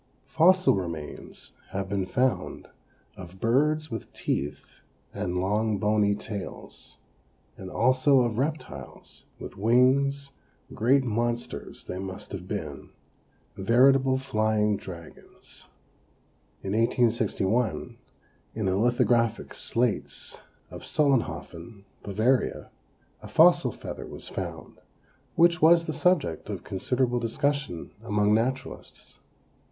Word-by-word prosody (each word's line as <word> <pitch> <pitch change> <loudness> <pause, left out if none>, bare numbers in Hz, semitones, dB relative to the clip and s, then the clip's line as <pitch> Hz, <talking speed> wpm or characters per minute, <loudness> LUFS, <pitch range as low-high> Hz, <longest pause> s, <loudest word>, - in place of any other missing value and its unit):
Fossil 185 +3 +4
remains 85 -6 -6 0.2
have 95 0 -3
been 95 -1 -2
found 130 +4 -1 0.5
of 95 0 -11
birds 150 +7 +1
with 115 -2 -6
teeth 70 0 -4 0.3
and 90 0 -3
long 105 +3 0
bony 105 -1 +2
tails, 100 -2 -8 0.6
and 95 - -9
also 130 +4 +3
of 120 -2 -1
reptiles, 150 +3 -5
with - - -9
wings; 135 +5 +3 0.4
great 130 +5 +3
monsters 120 0 -3
they 90 - -5
must 95 -1 -7
have - - -7
been - - -5 0.7
veritable 130 +6 +4
flying 110 -5 +1
dragons. 85 -4 -11 1.0
In 95 - -3
1861, 115 -1 0 0.6
in 110 -2 -2
the 95 0 +1
lithographic 120 0 +1
slates 105 - -2 0.4
of - - -8
Solenhofen, 115 - -1 0.2
Bavaria, 110 +6 0 0.5
a - - -9
fossil - - +5
feather - - -8
was - - -9
found - - -7 0.6
which 170 +1 +4
was 165 +1 +6
the 155 - -3
subject 170 - +1
of - - -5
considerable 125 +5 -1
discussion 130 - -2
among 105 -2 +1
naturalists. 125 +4 -3
115 Hz, 105 wpm, -27 LUFS, 100-130 Hz, 1.0 s, was